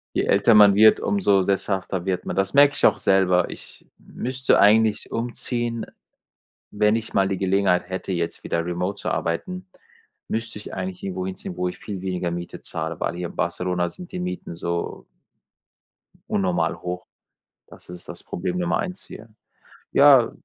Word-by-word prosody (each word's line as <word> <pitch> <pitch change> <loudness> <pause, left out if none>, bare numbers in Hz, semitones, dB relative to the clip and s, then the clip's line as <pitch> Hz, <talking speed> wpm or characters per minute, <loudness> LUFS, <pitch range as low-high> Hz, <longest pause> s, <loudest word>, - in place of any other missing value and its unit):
Je - - +1
älter 100 +3 +4
man 100 -2 +8
wird, 110 +1 +6
umso 185 - +2
sesshafter 95 -1 -1
wird 90 -2 -1
man. - - -4
Das 95 +3 0
merke 140 0 +6
ich - - +3
auch - - +4
selber. 90 -2 +3
Ich - - -12
müsste 130 +1 -1
eigentlich 110 +1 +4
umziehen, 120 0 -3 0.9
wenn 105 +1 +2
ich 115 0 -4
mal 95 -1 +3
die 95 -1 -2
Gelegenheit 95 -2 +1
hätte, 95 +1 -4
jetzt 85 -2 -3
wieder 85 0 -1
remote 90 +3 -3
zu - - -2
arbeiten, 185 - -3 0.6
müsste 115 -1 -4
ich - - -9
eigentlich 95 -1 -5
irgendwo 95 -1 -3
hinziehen, 95 -1 -6
wo 90 0 0
ich 90 - -5
viel 100 -4 -6
weniger 90 -2 -2
Miete 85 0 -6
zahle, - - -4
weil 85 - -2
hier 90 -1 -4
in - - -13
Barcelona 90 -1 -1
sind 180 - -10
die 180 - -5
Mieten 180 - -5
so 85 0 -4 1.3
unnormal 85 -4 0
hoch. 90 0 -5 0.6
Das - - -15
ist 90 0 -10
das - - -7
Problem 90 0 -3
Nummer 85 -1 0
1 185 -1 -4
hier. 115 +1 -11 0.6
Ja, 135 -4 +6
95 Hz, 165 wpm, -23 LUFS, 90-115 Hz, 1.3 s, man